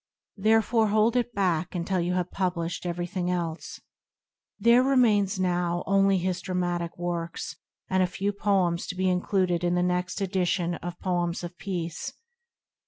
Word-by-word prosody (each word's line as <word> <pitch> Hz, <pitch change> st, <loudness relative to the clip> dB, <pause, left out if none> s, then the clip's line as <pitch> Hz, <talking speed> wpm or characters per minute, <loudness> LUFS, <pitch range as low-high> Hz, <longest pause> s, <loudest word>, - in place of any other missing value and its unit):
Therefore 220 Hz, +2 st, +3 dB
hold 215 Hz, +3 st, +3 dB
it 240 Hz, -1 st, +1 dB
back 185 Hz, -5 st, 0 dB
until 180 Hz, +2 st, -1 dB
you 175 Hz, +1 st, 0 dB
have 180 Hz, -1 st, -1 dB
published 180 Hz, -2 st, -2 dB
everything 175 Hz, +1 st, -2 dB
else." 170 Hz, -2 st, -3 dB, 0.8 s
There 235 Hz, +1 st, +5 dB
remain 245 Hz, -7 st, +4 dB
now 175 Hz, -1 st, 0 dB
only 195 Hz, 0 st, +3 dB
his 180 Hz, 0 st, -1 dB
dramatic 175 Hz, -2 st, -2 dB
works 170 Hz, -1 st, -4 dB, 0.3 s
and 185 Hz, 0 st, +2 dB
a 185 Hz, -, +3 dB
few 200 Hz, +2 st, -2 dB
poems 190 Hz, -4 st, +1 dB
to -, -, -4 dB
be 185 Hz, 0 st, 0 dB
included 180 Hz, -1 st, +1 dB
in 175 Hz, 0 st, +2 dB
the 180 Hz, -, +2 dB
next 180 Hz, +2 st, -1 dB
edition 180 Hz, -2 st, 0 dB
of 175 Hz, 0 st, -6 dB
Poems 175 Hz, -2 st, -1 dB
of 175 Hz, 0 st, -6 dB
Peace. 175 Hz, -4 st, -4 dB
180 Hz, 150 wpm, -27 LUFS, 175-195 Hz, 0.8 s, There